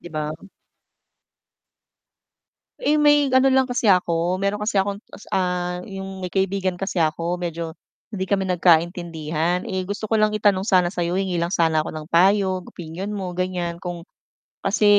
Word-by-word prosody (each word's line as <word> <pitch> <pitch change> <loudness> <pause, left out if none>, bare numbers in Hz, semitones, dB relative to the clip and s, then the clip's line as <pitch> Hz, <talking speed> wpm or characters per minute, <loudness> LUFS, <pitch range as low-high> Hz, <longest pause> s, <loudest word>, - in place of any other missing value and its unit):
'Di 175 - -10
ba? 155 -1 -3 2.5
Eh, 305 -11 +2
may 295 -1 +5
ano 265 +1 +5
lang 265 0 +3
kasi 240 -4 +2
ako 175 0 +1
meron 205 +1 -1
kasi 210 -2 +1
akong 200 +2 -2
ta's, - - -14
ah, 180 -1 -1
yung 195 -1 -7
may 180 - -4
kaibigan 190 -1 0
kasi 195 0 -3
ako 165 +1 0
medyo 170 -2 -5 0.3
hindi 200 -4 -4
kami 190 0 0
nagkaintindihan, 170 -1 +1 0.2
gusto 205 +2 -4
ko 225 - +2
lang 215 0 +3
itanong 205 -3 +2
sana 185 -4 +4
sa'yo 175 -1 -2
hingi 190 -2 -1
lang 170 +1 -1
sana 160 -4 +2
ako - - -6
ng 155 -1 -7
payo 185 +1 +3
opinyon 175 +4 -7
mo 190 -4 -4
ganiyan 180 -1 -3
kung 175 -1 -6 0.5
kasi 205 +2 +1
185 Hz, 155 wpm, -22 LUFS, 170-200 Hz, 2.5 s, may